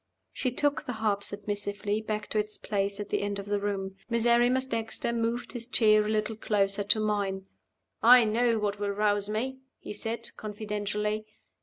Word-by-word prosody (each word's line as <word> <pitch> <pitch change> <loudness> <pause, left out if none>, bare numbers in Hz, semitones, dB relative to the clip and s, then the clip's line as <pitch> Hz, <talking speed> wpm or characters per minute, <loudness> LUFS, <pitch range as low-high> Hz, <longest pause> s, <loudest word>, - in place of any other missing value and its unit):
She 255 - 0
took 290 +4 +1
the 250 - -2
harp 215 -2 0
submissively 205 +1 -2
back 215 -1 -3
to 215 - +1
its 210 0 -3
place 200 -1 -2
at 205 - -5
the - - 0
end 205 0 -2
of 200 - -5
the 205 0 0
room. 195 -1 -3
Miserrimus 240 +2 +3
Dexter 230 -1 -2
moved 235 +1 -1
his 235 -2 -5
chair 215 -3 +4
a 210 - -3
little 215 +1 0
closer 205 -2 +1
to 210 +2 +4
mine. 200 -3 -1 0.6
"I 245 +1 +8
know 230 +2 +2
what 205 -1 -1
will 205 -1 -1
rouse 205 0 +1
me," 255 +5 -2 0.2
he - - -8
said, 225 +2 -4
confidentially. 210 0 -3
215 Hz, 175 wpm, -29 LUFS, 205-230 Hz, 0.6 s, I